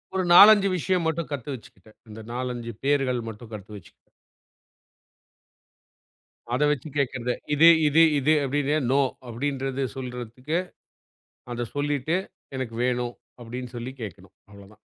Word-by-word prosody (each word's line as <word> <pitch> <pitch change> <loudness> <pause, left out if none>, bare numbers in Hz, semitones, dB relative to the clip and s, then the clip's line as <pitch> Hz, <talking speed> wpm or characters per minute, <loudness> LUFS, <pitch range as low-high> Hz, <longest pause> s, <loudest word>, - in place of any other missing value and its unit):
ஒரு 190 - +1
4-5 200 +3 +9
விஷயம் 180 0 0
மட்டும் 160 0 -2
கத்து 140 -1 -5
வச்சுக்கிட்டேன். 110 -3 -17
அந்த 110 +1 -10
4-5 120 -2 -4
பெயர்கள் 135 -3 +1
மட்டும் 115 +1 -9
கத்து 105 0 -9
வச்சு. 95 -5 -13 2.6
அத 125 - 0
வச்சு 145 +1 -3
கேக்கறதே. 125 -3 -1 0.2
இது 160 +3 +6 0.2
இது 150 +3 +5 0.2
இது 150 +3 +3
அப்டின்னு 145 +2 0 0.2
நோ 140 - +4 0.3
அப்டின்றது 135 +2 -2
சொல்றதுக்கு. 125 +3 -4 0.9
அத 120 -1 -3
சொல்லிட்டு 145 +2 0 0.4
எனக்கு 120 -3 -4
வேணும் 125 -1 -1 0.3
அப்டின்னு 125 +1 -7
சொல்லி 120 +2 -5
கேக்கணும். 95 -3 -9 0.2
அவ்ளோதான். 100 +1 -16
125 Hz, 120 wpm, -25 LUFS, 115-145 Hz, 2.6 s, 4-5